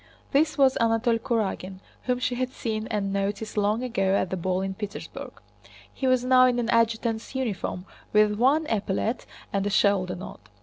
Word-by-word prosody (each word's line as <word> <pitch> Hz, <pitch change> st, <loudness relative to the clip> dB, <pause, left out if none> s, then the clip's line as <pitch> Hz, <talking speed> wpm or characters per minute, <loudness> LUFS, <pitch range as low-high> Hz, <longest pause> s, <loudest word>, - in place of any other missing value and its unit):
This 305 Hz, +3 st, +2 dB
was 270 Hz, -2 st, +4 dB
Anatole 230 Hz, 0 st, +2 dB
Kurágin 205 Hz, -6 st, -2 dB, 0.3 s
whom 250 Hz, -1 st, +1 dB
she 255 Hz, 0 st, -1 dB
had 250 Hz, +1 st, -1 dB
seen 220 Hz, -4 st, -4 dB
and 200 Hz, -2 st, -2 dB
noticed 200 Hz, +2 st, -2 dB
long 210 Hz, +3 st, +1 dB
ago 195 Hz, -6 st, +1 dB
at 185 Hz, -, 0 dB
the -, -, 0 dB
ball 185 Hz, +1 st, -1 dB
in 195 Hz, 0 st, -2 dB
Petersburg. 205 Hz, +1 st, -7 dB, 0.5 s
He 265 Hz, -, -2 dB
was 255 Hz, -1 st, +3 dB
now 255 Hz, 0 st, +6 dB
in 245 Hz, -1 st, +1 dB
an 240 Hz, -1 st, -1 dB
adjutant's 230 Hz, +1 st, 0 dB
uniform 210 Hz, -7 st, -3 dB, 0.3 s
with 210 Hz, 0 st, +4 dB
one 275 Hz, +8 st, +3 dB
epaulet 220 Hz, 0 st, -1 dB, 0.3 s
and 200 Hz, -1 st, +1 dB
a 205 Hz, -, 0 dB
shoulder 195 Hz, -3 st, +2 dB
knot. 185 Hz, -, -10 dB
220 Hz, 175 wpm, -26 LUFS, 200-250 Hz, 0.5 s, now